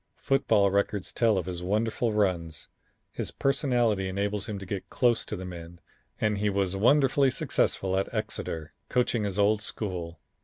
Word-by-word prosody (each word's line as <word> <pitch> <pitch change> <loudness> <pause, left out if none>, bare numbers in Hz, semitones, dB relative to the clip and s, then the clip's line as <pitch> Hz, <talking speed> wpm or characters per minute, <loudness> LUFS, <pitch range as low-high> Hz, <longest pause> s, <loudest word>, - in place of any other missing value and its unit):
Football 105 -7 +2
records 100 0 -1
tell 115 -4 +3
of 90 - -1
his 90 -2 -5
wonderful 110 +4 0
runs. 90 -7 -1 0.4
His - - -3
personality 120 -8 +1
enables 100 +2 -2
him 105 - -3
to 95 - -7
get 95 +1 -5
close 120 -2 +2
to 105 - -4
the 95 -1 -6
men, 85 -1 -9 0.4
and 105 -2 +1
he 105 0 +1
was 100 -1 0
wonderfully 135 +5 +4
successful 95 -6 0
at 95 +1 -1
Exeter, 105 -8 -4 0.2
coaching 120 -3 +1
his 100 -1 -3
old 105 +1 +3
school. 90 -7 -4
100 Hz, 160 wpm, -28 LUFS, 95-110 Hz, 0.4 s, wonderfully